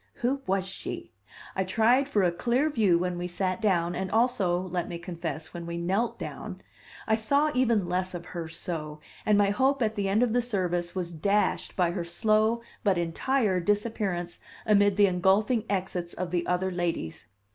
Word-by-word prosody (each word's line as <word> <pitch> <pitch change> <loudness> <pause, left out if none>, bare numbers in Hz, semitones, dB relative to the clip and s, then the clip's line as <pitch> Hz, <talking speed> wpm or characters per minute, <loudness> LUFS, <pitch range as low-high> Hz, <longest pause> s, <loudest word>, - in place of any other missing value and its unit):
Who 265 +3 -1
was 190 0 +1
she? 190 - -6 0.4
I 190 - +1
tried 230 +8 +3
for 210 -8 +2
a 175 - +3
clear 245 - +1
view 205 -10 +3
when 180 0 -2
we 175 - -2
sat 185 +3 -2
down, 175 -5 +2
and 190 +1 -3
also, 220 -6 +2
let 180 -2 -3
me 170 - -4
confess, 165 -3 -6
when 170 -1 -6
we 170 0 -4
knelt 190 +7 0
down; - - -7 0.4
I 220 - +3
saw 280 +7 +2
even 235 -8 +2
less 180 +1 -1
of 175 0 -6
her 170 -2 -5
so; 160 -2 -5 0.3
and 210 -1 +5
my 200 -1 +4
hope 265 +4 +2
at 220 -1 +1
the 200 -3 -1
end 210 +5 +3
of 235 -3 +1
the 245 - +3
service 180 -7 -1
was 175 -2 -2
dashed 200 +6 0
by 180 -3 +2
her 175 -1 -3
slow 215 +6 +2 0.2
but 195 -5 +3
entire 185 +4 +1
disappearance 200 -3 -1 0.3
amid 205 -2 +4
the 205 - +7
engulfing 200 +5 +2
exits 180 -3 -2
of 180 -2 -4
the 175 -1 -1
other 185 +1 0
ladies. 165 - -3
190 Hz, 185 wpm, -28 LUFS, 175-220 Hz, 0.4 s, the